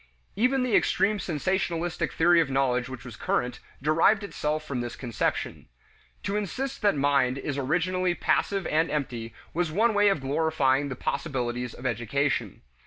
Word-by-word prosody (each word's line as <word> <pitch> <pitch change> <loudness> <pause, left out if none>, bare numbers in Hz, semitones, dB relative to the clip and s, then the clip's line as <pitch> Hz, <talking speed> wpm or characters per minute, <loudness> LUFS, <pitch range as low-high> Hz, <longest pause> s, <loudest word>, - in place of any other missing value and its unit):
Even 250 +5 +2
the 250 -3 +1
extreme 210 +1 +2
sensationalistic 175 0 -1
theory 170 +1 +4
of 155 - -1
knowledge 130 -2 +1
which 130 -1 -8
was 120 -3 -8
current 125 +2 -1 0.2
derived 165 +8 +4
itself 155 -4 -2
from 135 -5 -3
this 120 0 -5
conception. 120 -4 -2 0.6
To 200 - -2
insist 240 +6 -3
that 205 -5 +3
mind 140 -2 +2
is 140 +1 -3
originally 175 +6 0
passive 195 0 0
and 160 +2 +1
empty 120 -6 -3 0.2
was 170 -1 0
one 220 +7 +3
way 205 0 +5
of 195 - +1
glorifying 140 -1 +1
the 130 - -4
possibilities 125 -4 -3
of 125 - -11
education. 130 +4 -1
150 Hz, 155 wpm, -27 LUFS, 130-185 Hz, 0.6 s, way